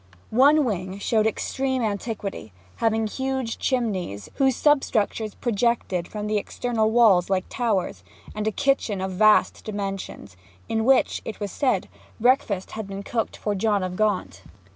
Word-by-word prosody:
One 285 +5 +5
wing 190 -4 -3
showed 215 +1 +1
extreme 260 +3 -1
antiquity, 205 - -4 0.2
having 225 -1 +1
huge 265 +1 -3
chimneys, 195 - -2
whose 265 -2 +3
substructures 225 -7 +1
projected 225 -6 0
from 210 -1 -5
the 210 0 +1
external 225 0 -1
walls 220 -7 +4
like 190 -1 +1
towers; 220 -7 -1 0.3
and 215 0 -3
a - - +2
kitchen 255 -5 0
of 190 0 -3
vast 215 +3 +3
dimensions, 195 - -5 0.3
in 220 0 0
which 265 +1 +3
(it 220 - -7
was 205 -2 -4
said) 270 -3 0 0.3
breakfasts 225 -6 +1
had 220 -2 -6
been 200 0 -6
cooked 225 +1 -2
for 210 - -2
John 205 0 +1
of 180 0 -3
Gaunt. 185 - -1
215 Hz, 145 wpm, -24 LUFS, 195-240 Hz, 0.3 s, One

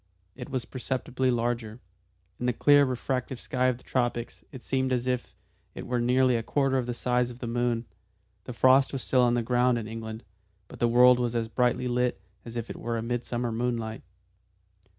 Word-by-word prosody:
It - - -8
was 130 -3 -3
perceptibly 130 0 -2
larger; 120 -2 -1 0.6
in 125 - -1
the 125 - +2
clear 145 +4 +5
refractive 130 0 -3
sky 130 0 0
of 125 -2 +1
the - - -20
tropics 120 -2 -2
it 130 - -10
seemed 130 -1 0
as 125 -1 0
if 125 -1 -2 0.4
it - - -7
were 125 -1 -1
nearly 125 +1 +3
a 115 - 0
quarter 135 +2 +1
the 120 0 -4
size 125 0 0
of 120 - -10
the 125 - -6
moon. 120 0 -1 0.6
The 125 - -6
frost 130 +3 +4
was 135 - -3
still 130 - +2
on 120 -1 +3
the 120 - 0
ground 125 +1 +2
in 110 -2 -4
England, 110 0 -7 0.4
but - - -12
the 120 - +3
world 125 +1 +6
was 120 -1 -1
as 115 -1 0
brightly 125 +1 +1
lit 125 -3 0 0.3
as 115 0 -9
if 120 -1 -3
it - - -7
were 115 -1 -2
midsummer 120 0 -2
moonlight. 115 -1 -2
125 Hz, 190 wpm, -27 LUFS, 120-125 Hz, 0.6 s, world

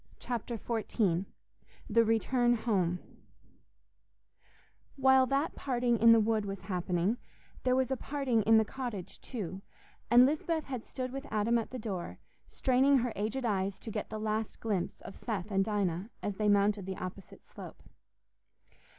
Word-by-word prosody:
Chapter 235 -1 -4
XIV 205 -5 0 0.6
The 230 +2 +4
Return 240 +2 +2
Home 190 -7 0 2.0
While 265 -1 +5
that 275 +3 0
parting 240 -3 0
in 230 +1 +7
the 230 - +7
wood 220 0 +1
was 195 -1 -5
happening, 185 +3 -1 0.4
there 255 0 +2
was 260 0 +1
a - - +2
parting 270 -4 0
in 225 +2 +5
the 220 - +4
cottage 235 -6 -6
too, 195 -6 -5 0.5
and 245 +1 +8
Lisbeth 315 +3 0
had 255 -5 -6
stood 255 -1 -4
with 275 +2 -6
Adam 220 +2 +2
at 225 - -5
the 255 - -6
door, 200 -7 -5 0.3
straining 265 +2 +3
her 245 -2 0
aged 220 +6 -2
eyes 195 -3 0
to 225 - -7
get 210 0 -4
the 215 - -4
last 215 0 -2
glimpse 200 -6 -2
of 195 - -9
Seth 215 -3 -4
and 195 -1 +3
Dinah, 200 -2 -1
as 205 -2 -3
they 210 -1 +2
mounted 200 -1 +2
the 190 - -4
opposite 185 0 -8
slope. - - -11
220 Hz, 155 wpm, -31 LUFS, 200-250 Hz, 2.0 s, and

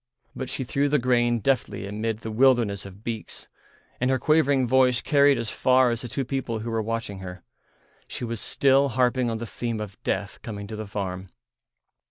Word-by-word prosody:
But 130 - -5
she 130 - -3
threw 140 +3 0
the 150 - +3
grain 120 -2 +2
deftly 130 -3 0
amid 110 +2 -3
the 110 - -5
wilderness 115 -5 +3
of 100 +2 -14
beaks, 115 -2 -6 0.5
and 125 - +1
her 130 - +3
quavering 140 -2 +3
voice 125 -1 +4
carried 140 -2 +4
as 115 -1 -3
far 130 -1 +3
as 115 0 -2
the 125 - -5
two 135 +3 -3
people 125 -3 -2
who 115 +1 -4
were 115 -1 0
watching 115 -3 -4
her. 90 -2 -8 0.6
She - - -6
was 115 -3 -4
still 140 0 +3
harping 125 0 +1
on 115 - -2
the 115 - -5
theme 115 0 -4
of 105 -2 -7
death 100 +1 -3
coming 100 -3 -6
to 110 +2 -7
the 110 0 -6
farm. 95 -2 -4
115 Hz, 195 wpm, -25 LUFS, 105-130 Hz, 0.6 s, voice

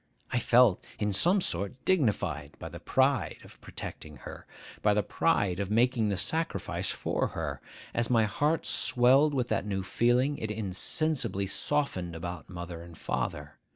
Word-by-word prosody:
I 125 - +1
felt, 120 -4 +4
in 105 -1 -1
some 180 - +3
sort, 100 - -2
dignified 105 - 0
by - - -7
the - - -9
pride 135 -1 +1
of - - -16
protecting 75 -2 -8
her,—by 105 +9 -4
the 105 - +2
pride 100 - +1
of 100 -1 -2
making 115 0 +2
the 100 - -1
sacrifice 160 - -1
for - - -1
her. - - -3 0.3
As 120 -1 0
my 115 -3 +4
heart 145 - 0
swelled 135 +4 +4
with 125 -2 0
that 105 - -1
new 95 -2 -2
feeling, 125 +8 +1
it 110 - -3
insensibly 105 - 0
softened 95 - -1
about 85 -1 -6
mother 85 -2 -7
and 85 -1 -12
father. 75 0 -4
110 Hz, 155 wpm, -29 LUFS, 90-130 Hz, 0.3 s, felt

